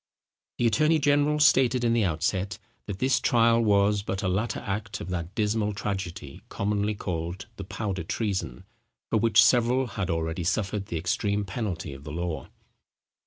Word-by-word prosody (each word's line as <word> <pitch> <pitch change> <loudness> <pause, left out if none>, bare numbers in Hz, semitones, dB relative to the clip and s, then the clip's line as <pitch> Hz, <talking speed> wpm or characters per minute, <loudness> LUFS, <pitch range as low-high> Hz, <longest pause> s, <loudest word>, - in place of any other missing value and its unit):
The 120 - +1
attorney 150 +9 +3
general 145 +1 +2
stated 130 -4 +4
in 115 -1 +3
the 115 -3 +2
outset, 95 +5 -1 0.3
that 100 -3 -4
this 130 +4 +2
trial 115 -1 +4
was 100 -1 +3
but 95 -1 -4
a - - +1
latter 100 +6 -1
act 100 +1 -4
of 90 - -6
that 90 +1 -4
dismal 105 -1 0
tragedy, 95 -8 -5
commonly 105 +1 -1
called 85 0 -4
the 100 - -5
Powder 100 -2 -3
Treason, 95 - -3 0.5
for - - +3
which 110 -1 +5
several 125 +2 +3
had 100 -6 -4
already 80 +1 -2
suffered 95 +2 -1
the 85 - -3
extreme 100 +5 -1
penalty 95 - -4
of 70 +1 -11
the 75 - -7
law. 85 0 -4
100 Hz, 165 wpm, -27 LUFS, 90-115 Hz, 0.5 s, which